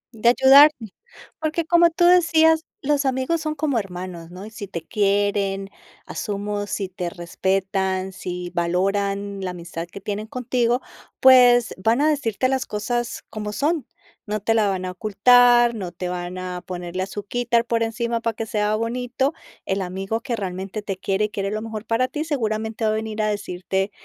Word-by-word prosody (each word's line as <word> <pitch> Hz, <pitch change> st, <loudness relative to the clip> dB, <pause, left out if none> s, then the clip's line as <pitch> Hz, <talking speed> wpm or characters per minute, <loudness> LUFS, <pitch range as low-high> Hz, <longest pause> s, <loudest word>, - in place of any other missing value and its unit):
De 235 Hz, +2 st, +3 dB
ayudarte, 265 Hz, -3 st, +6 dB, 0.5 s
porque 315 Hz, +1 st, -1 dB
como 340 Hz, 0 st, +5 dB
tú 345 Hz, +1 st, +1 dB
decías 325 Hz, -2 st, +5 dB, 0.2 s
los 290 Hz, 0 st, +1 dB
amigos 265 Hz, +5 st, 0 dB
son 310 Hz, -1 st, -2 dB
como 285 Hz, -5 st, 0 dB
hermanos, 180 Hz, -3 st, -7 dB
¿no?, 185 Hz, +3 st, -9 dB
y 220 Hz, -, -10 dB
si 210 Hz, -3 st, -7 dB
te 170 Hz, -3 st, -6 dB
quieren 200 Hz, -1 st, 0 dB, 0.3 s
asumo, 205 Hz, -1 st, -4 dB
si 195 Hz, -2 st, -3 dB
te 180 Hz, -1 st, -4 dB
respetan, 190 Hz, +2 st, -1 dB
si 180 Hz, -1 st, -6 dB
valoran 195 Hz, +3 st, -1 dB
la 185 Hz, -1 st, -3 dB
amistad 170 Hz, -1 st, -7 dB
que 200 Hz, +3 st, -10 dB
tienen 210 Hz, +1 st, -4 dB
contigo, 245 Hz, 0 st, 0 dB, 0.4 s
pues 245 Hz, -2 st, +6 dB
van 225 Hz, +6 st, +2 dB
a 305 Hz, -, +4 dB
decirte 255 Hz, -5 st, 0 dB
las 260 Hz, -1 st, -1 dB
cosas 240 Hz, +3 st, -3 dB
como 210 Hz, -1 st, -5 dB
son, 295 Hz, +4 st, 0 dB, 0.4 s
no 210 Hz, +1 st, -2 dB
te 220 Hz, +3 st, +1 dB
la 220 Hz, -2 st, +3 dB
van 185 Hz, -1 st, -2 dB
a 185 Hz, -, -3 dB
ocultar, 240 Hz, +4 st, +5 dB
no 190 Hz, -6 st, -5 dB
te 180 Hz, 0 st, -5 dB
van 180 Hz, 0 st, -5 dB
a 180 Hz, -1 st, -5 dB
ponerle 180 Hz, 0 st, -5 dB
azuquítar 230 Hz, +4 st, -1 dB
por 230 Hz, -1 st, 0 dB
encima 230 Hz, +1 st, -1 dB
para 230 Hz, -2 st, -1 dB
que 225 Hz, -, -4 dB
sea 210 Hz, 0 st, 0 dB
bonito. 245 Hz, +5 st, -1 dB, 0.3 s
El 190 Hz, 0 st, -1 dB
amigo 195 Hz, +5 st, -3 dB
que 240 Hz, -2 st, -2 dB
realmente 195 Hz, +1 st, -5 dB
te 195 Hz, -2 st, -4 dB
quiere 195 Hz, +2 st, 0 dB
y 210 Hz, -, -4 dB
quiere 195 Hz, -2 st, -3 dB
lo 215 Hz, +1 st, -3 dB
mejor 220 Hz, -1 st, -6 dB
para 240 Hz, +3 st, +1 dB
ti 300 Hz, +3 st, -4 dB
seguramente 220 Hz, -6 st, -2 dB
va 215 Hz, -, +3 dB
a -, -, 0 dB
venir 220 Hz, 0 st, -4 dB
a -, -, +1 dB
decirte, 190 Hz, -1 st, -2 dB
215 Hz, 175 wpm, -22 LUFS, 190-245 Hz, 0.5 s, ayudarte